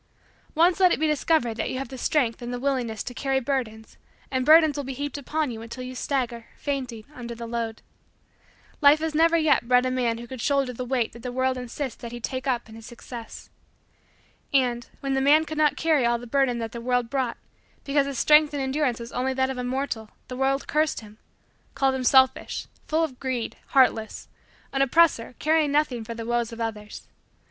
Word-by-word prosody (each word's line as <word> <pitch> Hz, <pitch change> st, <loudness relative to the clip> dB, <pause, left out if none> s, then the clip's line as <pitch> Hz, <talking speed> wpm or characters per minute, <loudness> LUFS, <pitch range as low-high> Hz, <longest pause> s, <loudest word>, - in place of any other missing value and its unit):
Once 345 Hz, +4 st, +4 dB
let 365 Hz, -2 st, +6 dB
it -, -, +1 dB
be 315 Hz, -, +2 dB
discovered 300 Hz, -6 st, +1 dB
that -, -, -2 dB
you -, -, -3 dB
have 270 Hz, -, -4 dB
the 265 Hz, -, -8 dB
strength 245 Hz, -6 st, +1 dB
and 240 Hz, 0 st, -5 dB
the 245 Hz, -, -3 dB
willingness 245 Hz, -5 st, -1 dB
to 245 Hz, -, -6 dB
carry 270 Hz, +1 st, 0 dB
burdens 235 Hz, -5 st, -4 dB, 0.3 s
and 260 Hz, 0 st, -1 dB
burdens 315 Hz, -2 st, +7 dB
will 285 Hz, -, -3 dB
be 265 Hz, 0 st, -5 dB
heaped 285 Hz, +1 st, -4 dB
upon 300 Hz, 0 st, -2 dB
you 225 Hz, -1 st, -7 dB
until 235 Hz, +3 st, -7 dB
you 255 Hz, 0 st, -6 dB
stagger, 245 Hz, -3 st, -2 dB
fainting, 255 Hz, -6 st, -4 dB
under 235 Hz, -3 st, -7 dB
the 235 Hz, 0 st, -7 dB
load. 230 Hz, -1 st, -4 dB, 1.0 s
Life 290 Hz, +1 st, +7 dB
has 315 Hz, 0 st, -3 dB
never 330 Hz, +2 st, +4 dB
yet 310 Hz, -6 st, +2 dB
bred 250 Hz, 0 st, +4 dB
a 255 Hz, -, 0 dB
man 245 Hz, -3 st, 0 dB
who 235 Hz, -, -8 dB
could 255 Hz, 0 st, -8 dB
shoulder 275 Hz, -2 st, +1 dB
the 255 Hz, -, -5 dB
weight 245 Hz, -2 st, -1 dB
that 235 Hz, -, -11 dB
the 250 Hz, -, -5 dB
world 260 Hz, +1 st, 0 dB
insists 250 Hz, +1 st, -5 dB
that 235 Hz, -, -7 dB
he 240 Hz, -, -6 dB
take 260 Hz, +3 st, -4 dB
up 245 Hz, -3 st, 0 dB
in 220 Hz, -, -13 dB
his 225 Hz, 0 st, -11 dB
success. 235 Hz, -1 st, -10 dB, 1.0 s
And, 245 Hz, -3 st, +1 dB
when 275 Hz, -1 st, -1 dB
the 270 Hz, -, +1 dB
man 300 Hz, +3 st, +5 dB
could 310 Hz, 0 st, -5 dB
not 300 Hz, -3 st, +3 dB
carry 315 Hz, -5 st, +2 dB
all 235 Hz, 0 st, +2 dB
the 240 Hz, -, -10 dB
burdens 255 Hz, 0 st, +1 dB
that 225 Hz, -1 st, -4 dB
the 235 Hz, -, -7 dB
world 245 Hz, 0 st, 0 dB
brought 260 Hz, -4 st, -1 dB, 0.5 s
because 280 Hz, 0 st, +1 dB
his 275 Hz, -2 st, -4 dB
strength 300 Hz, +1 st, +5 dB
and 280 Hz, -, -1 dB
endurance 265 Hz, -2 st, 0 dB
was 235 Hz, 0 st, -8 dB
only 260 Hz, +1 st, -1 dB
that 265 Hz, 0 st, +1 dB
of 255 Hz, -, -5 dB
a -, -, -2 dB
mortal, 245 Hz, -4 st, -3 dB, 0.2 s
the 255 Hz, -, -5 dB
world 270 Hz, +1 st, 0 dB
cursed 305 Hz, -3 st, +1 dB
him 215 Hz, 0 st, -15 dB, 0.6 s
called 270 Hz, -1 st, +2 dB
him 260 Hz, -1 st, -2 dB
selfish, 260 Hz, 0 st, +3 dB, 0.2 s
full 315 Hz, +1 st, +1 dB
of 265 Hz, -6 st, -4 dB
greed, 255 Hz, -4 st, -3 dB
heartless, 230 Hz, -5 st, +2 dB, 0.4 s
an 270 Hz, -, +1 dB
oppressor 275 Hz, -4 st, +3 dB
caring 310 Hz, -1 st, +2 dB
nothing 285 Hz, -6 st, +1 dB
for 230 Hz, +1 st, -7 dB
the 230 Hz, 0 st, -6 dB
woes 240 Hz, 0 st, -1 dB
of 230 Hz, -, -9 dB
others. 215 Hz, -2 st, -5 dB
260 Hz, 215 wpm, -25 LUFS, 235-280 Hz, 1.0 s, burdens